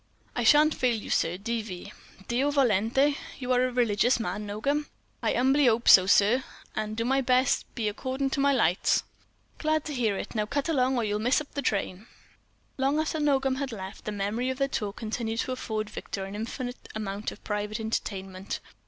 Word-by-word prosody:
"I 245 - 0
shan't 300 +6 +6
fail 250 -2 +1
you, 215 - -6
sir—D.V." 200 +2 -2 0.3
"Deo 255 +4 +1
volente? 265 +1 +3 0.2
You 255 -1 -3
are 250 0 +4
a - - -4
religious 240 0 +2
man, 210 -2 -3
Nogam?" 280 +9 -1 0.3
"I - - +1
'umbly 265 +2 +4
'ope 230 +1 0
so, 185 -1 +9
sir, 210 +6 +4 0.3
and 215 0 -3
do 230 - 0
my 270 +2 +2
best 255 0 +3
to - - -16
be, 225 -3 -1
accordin' 260 +5 -2
to - - -1
my 280 +1 +4
lights." 190 -9 +2 0.6
"Glad 310 -1 +1
to 300 - -4
hear 225 -6 0
it. - - -6
Now 210 -2 -1
cut 285 +5 -1
along, 260 -5 +2
or 235 - +1
you'll 210 -1 -1
miss 245 +5 +2
the 300 - -1
up 285 - -2
train." 200 -2 -2 0.7
Long 275 +3 +2
after 315 0 -1
Nogam 270 -3 +2
had 275 -1 -3
left 190 -2 -8
the 215 - -2
memory 210 +5 -1
of 260 - -2
their 275 0 +1
talk 210 -6 -3
continued 225 0 -2
to - - -4
afford 220 -4 -3
Victor 195 -2 -5
an 195 - -8
infinite 245 +3 -5
amount 205 0 -3
of - - -13
private 210 +1 -3
entertainment. 195 -3 -4
235 Hz, 195 wpm, -27 LUFS, 210-270 Hz, 0.7 s, so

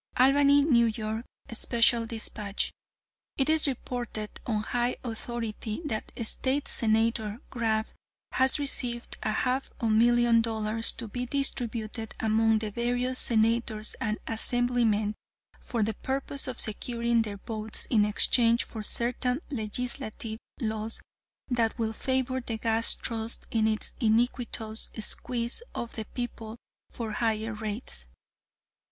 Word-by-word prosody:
"Albany, 280 +2 +6
N. 235 -6 +4
Y., 220 +1 -3 0.3
Special 235 0 +3
Despatch: 215 -3 -3 0.7
It 275 +3 +3
is 315 -1 +6
reported 240 -4 -4 0.2
on 215 -3 0
high 240 +2 0
authority 230 -2 -4
that 220 -7 -3 0.2
State 270 +5 +1
Senator 220 -1 +2
Grab 220 -3 0 0.5
has 260 0 +3
received 250 -4 0
a - - 0
half 255 +4 0
million 235 +1 +4
dollars, 225 0 +1
to 235 - -5
be 245 +4 -4
distributed 235 -5 -1
among 225 0 +3
the 215 -1 -3
various 245 +3 0
senators 225 -1 +3
and 215 -1 0
assemblymen, 225 -2 +1 0.5
for 230 -3 -2
the 220 +1 0
purpose 275 +4 -2
of 255 -1 -4
securing 235 +1 +2
their 210 -2 -4
votes 215 +1 -4
in 215 -4 +5
exchange 230 +3 +4
for 220 - -7
certain 250 +4 0
legislative 220 -2 -3 0.2
laws 220 -2 -2 0.4
that 235 -3 0
will 225 -2 -1
favor 260 +2 0
the 230 -2 -4
Gas 225 +1 +3
Trust 225 0 -3
in 220 -1 +2
its 215 -1 -1
iniquitous 225 -1 0
squeeze 235 - +1
of 235 - -4
the 220 - -4
people 230 -2 -5 0.3
for 225 -2 -5
higher 220 0 -1
rates. 210 - -5
230 Hz, 120 wpm, -28 LUFS, 220-245 Hz, 0.7 s, Albany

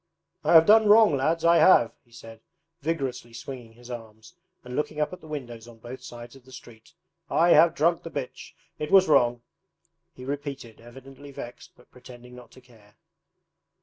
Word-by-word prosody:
'I - - +1
have 165 -1 +8
done 215 +1 +5
wrong, 210 -5 +6
lads, 160 +5 -1
I 170 0 +5
have!' 120 -12 +5
he 120 - -32
said, 115 -1 -13 0.4
vigorously 135 -6 -4
swinging 120 -1 -10
his 120 +1 -14
arms 110 +3 -11 0.3
and 125 0 -9
looking 150 0 -3
up 150 +2 -1
at 180 - -10
the - - -14
windows 120 -6 -8
on 120 -1 -15
both 120 +3 -11
sides 120 +1 -11
of 135 - -17
the 130 - -19
street. 115 -3 -15 0.4
'I 170 +1 +2
have 170 -1 +5
drunk 170 +1 +1
the 165 - -9
bitch; 140 -5 -8 0.3
it 150 - -4
was 190 -1 +5
wrong,' 120 -5 +2 0.7
he 125 - -11
repeated, 140 -5 -7
evidently 135 +4 -14
vexed 120 -2 -11
but 125 - -23
pretending 125 0 -15
not 125 -2 -14
to 130 - -17
care. 110 -4 -23
130 Hz, 180 wpm, -25 LUFS, 120-155 Hz, 0.7 s, have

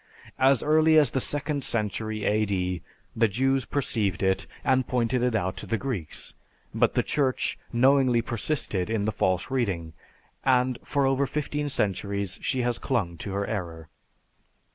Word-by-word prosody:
As 135 -2 +4
early 155 +1 +5
as 145 -6 +5
the 130 - 0
second 145 0 -1
century 110 -1 -2
A.D. 95 -4 0 0.3
the 115 0 +4
Jews 130 +5 +1
perceived 105 -9 -1
it 95 0 +1 0.2
and 130 -1 +2
pointed 125 0 0
it 125 -2 +1
out 95 -2 -1
to - - -7
the 115 - 0
Greeks, 110 - -5 0.4
but - - +2
the - - +3
Church 135 -3 0 0.2
knowingly 130 -1 +4
persisted 115 -6 -2
in 110 -2 0
the 110 - +1
false 95 0 0
reading, 95 -11 -1 0.5
and 125 -1 +2
for 140 -1 0
over 135 +1 +2
fifteen 145 +1 -2
centuries 100 -4 -1
she 130 -2 0
has 120 -1 0
clung 105 -11 -1
to 100 +4 -5
her 100 0 -1
error." 85 -7 -5
115 Hz, 155 wpm, -26 LUFS, 100-135 Hz, 0.5 s, early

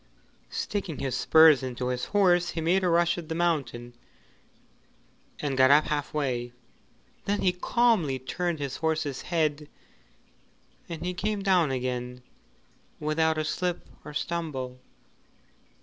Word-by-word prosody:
Sticking 195 -7 -3
his 130 -3 -2
spurs 160 0 +6
into 125 -1 -3
his 125 -1 -2
horse 180 -4 +3
he 165 - -4
made 175 +4 +2
a 180 - +2
rush 170 +1 +2
at 160 - -10
the 160 - -2
mountain, 135 -8 -1 1.5
and 140 -2 -2
got 130 0 +5
up 145 +2 +6
half 145 -1 -2
way, 125 -5 -2 0.7
then 205 0 0
he 185 - +3
calmly 180 - +2
turned 170 +6 -3
his 140 -2 -4
horse's 155 -4 -1
head 155 -3 -1 1.2
and 175 +2 -4
came 205 +1 -2
down 180 -6 +3
again 125 -1 -3 0.8
without 160 +1 +1
a 155 - -1
slip 175 +3 -2 0.2
or 150 - -8
stumble. 145 -7 -3
155 Hz, 130 wpm, -27 LUFS, 130-175 Hz, 1.5 s, spurs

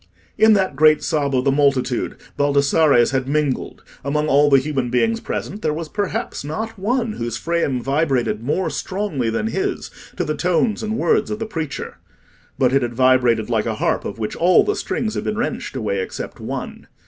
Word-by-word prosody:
In 220 0 +6
that 190 -8 +1
great 155 +1 +5
sob 145 -4 0
of 125 - +2
the 140 - +4
multitude 135 -3 +1 0.2
Baldassarre's 140 -2 +3
had 130 -1 -1
mingled. 145 -2 -1 0.2
Among 150 +2 0
all 145 +1 +4
the 135 - +6
human 135 -2 -1
beings 225 - +1
present, 210 -2 -5
there 155 -4 0
was 160 -1 -5
perhaps 205 - -3
not 220 +9 -5
one 235 +3 0
whose 120 - -4
frame 165 -6 -1
vibrated 135 -5 0
more 150 +10 -1
strongly 185 - -2
than 115 - -1
his 380 - -2 0.3
to 180 - 0
the 155 -2 -1
tones 180 +8 +1
and 220 0 -2
words - - +2
of 215 - -2
the 225 - -3
preacher; 160 -9 -5 0.6
but 130 -2 +2
it 135 - +4
had 120 -1 -3
vibrated 125 -3 +3
like 115 -2 0
a 110 - -1
harp - - 0
of 100 - -5
which 110 -1 -3
all 175 +2 +5
the 415 - 0
strings 225 - -2
had - - -3
been 215 - -2
wrenched 235 - -3
away 105 -6 -1
except - - -6
one. - - -6
150 Hz, 190 wpm, -20 LUFS, 130-195 Hz, 0.6 s, In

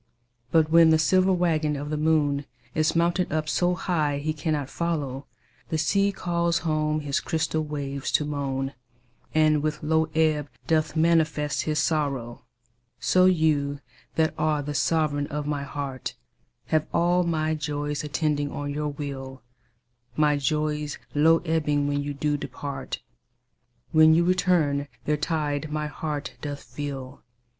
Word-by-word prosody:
But 160 -1 +3
when 165 -1 +7
the 160 - +5
silver 185 +5 +3
waggon 160 -4 +1
of 145 +1 -5
the - - 0
moon 150 -2 +1 0.3
Is 155 +1 +1
mounted 170 +2 +1
up 155 0 -1
so 180 +2 +1
high 155 -5 0
he 155 +2 -2
cannot 150 -2 -2
follow, 145 -4 -3 0.4
The 160 - 0
sea 200 +5 +2
calls 170 -3 0
home 155 -1 +1
his 145 -1 0
crystal 160 -1 -1
waves 140 -2 -4
to 150 - +3
moan, 135 -2 -2 0.6
And 155 -1 +4
with 155 0 -2
low 160 +1 +2
ebb 155 -2 +2 0.2
doth 155 -1 +1
manifest 160 -2 +2
his 155 -1 0
sorrow. 140 -7 -1 0.6
So 185 0 +4
you 155 -5 +2 0.4
that 160 -1 +2
are 150 -1 +1
the 145 +1 -4
sovereign 145 -1 +1
of 150 0 -4
my 145 -1 -1
heart 140 -2 -5 0.5
Have 155 0 +2
all 175 +1 +3
my 160 -2 0
joys 145 -1 -3
attending 150 -1 -1
on 145 0 -4
your 150 0 -2
will; 135 -3 -6 0.7
My 150 -1 +3
joys 150 +1 -1 0.2
low 160 +3 +4
ebbing 150 -3 +1
when 145 0 0
you 145 0 -4
do 145 +1 0
depart, 140 0 -6 0.9
When 155 0 +7
you 170 - +4
return 170 -6 +2 0.2
their 150 - +2
tide 150 -1 -2
my 150 0 -1
heart 150 0 -4
doth 145 -1 -5
fill. 135 +1 -6
150 Hz, 145 wpm, -26 LUFS, 145-160 Hz, 0.9 s, when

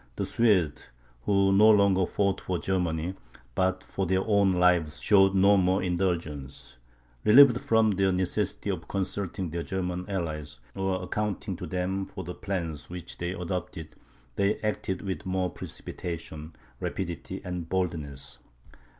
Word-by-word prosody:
The - - -2
Swedes, 95 -11 +1 0.4
who 100 -1 +3
no 105 +3 +7
longer 100 -3 +4
fought 100 -1 0
for 90 - -2
Germany, 90 -2 -1 0.4
but 95 +4 0
for 95 -2 -3
their 95 +1 +1
own 100 -3 +4
lives, 90 -5 +2
showed 95 -1 +4
no 100 +2 +6
more 95 +1 +2
indulgence; 85 -8 -3 0.4
relieved 125 +2 +7
from 110 -1 +3
the 95 -1 +2
necessity 90 -1 -1
of - - -5
consulting 95 -2 -3
their 85 +1 -2
German 90 0 -3
allies, 80 -6 -4 0.2
or 95 -1 -1
accounting 100 -1 -2
to 90 -1 -6
them 95 +1 -2
for 95 - -7
the 90 - -6
plans 85 -7 -4
which 85 -1 -7
they 85 +1 -2
adopted, 85 -3 -4 0.5
they 100 +2 +2
acted 105 -3 -2
with 95 -1 -4
more 95 -1 0
precipitation, 80 -3 -7 0.2
rapidity, 95 +1 -4
and 90 -2 -4
boldness. 80 -7 -3
95 Hz, 140 wpm, -28 LUFS, 85-95 Hz, 0.5 s, no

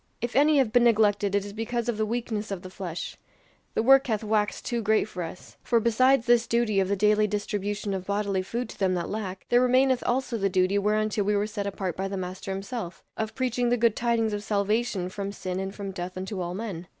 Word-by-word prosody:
If 240 0 -4
any 295 +2 +5
have 260 -6 +3
been 245 -1 +5
neglected 205 -3 +3
it 200 0 +1
is 205 - -8
because 230 +2 -2
of 240 -3 -1
the 215 0 0
weakness 225 -2 -3
of 195 -3 -5
the 185 - -9
flesh. 180 -3 -6 0.6
The 220 - +2
work 270 +2 +6
hath 220 -2 -1
waxed 210 -1 0
too 235 -1 -1
great 215 0 +2
for 180 -4 -6
us; 170 +1 -8
for 235 - +2
besides 240 +3 +3
this 240 -1 +4
duty 230 -4 +2
of 190 - +2
the 200 - +1
daily 210 +1 +3
distribution 205 0 -2
of 190 -1 -4
bodily 200 -1 0
food 235 +6 -3
to - - -11
them 190 -2 +2
that 175 - -3
lack, 195 -3 -5
there 240 0 +5
remaineth 255 0 +3
also 245 -2 0
the 195 0 +1
duty 185 +2 +2
whereunto 215 +1 +1
we 205 +1 +1
were 205 0 +1
set 205 -1 -4
apart 190 -3 -3
by 190 +1 -2
the 195 0 -4
Master 185 +1 -5
himself 195 -1 -5
of 220 0 -3
preaching 245 -1 0
the 245 - +2
good 230 -2 +3
tidings 230 -2 +1
of 205 0 -3
salvation 210 -2 0
from 200 +1 -4
sin 185 -2 -4
and 195 +1 -4
from 200 -1 -5
death 180 0 -6
unto 190 +1 -4
all 175 0 -3
men. 190 -5 -5
210 Hz, 235 wpm, -27 LUFS, 195-235 Hz, 0.6 s, work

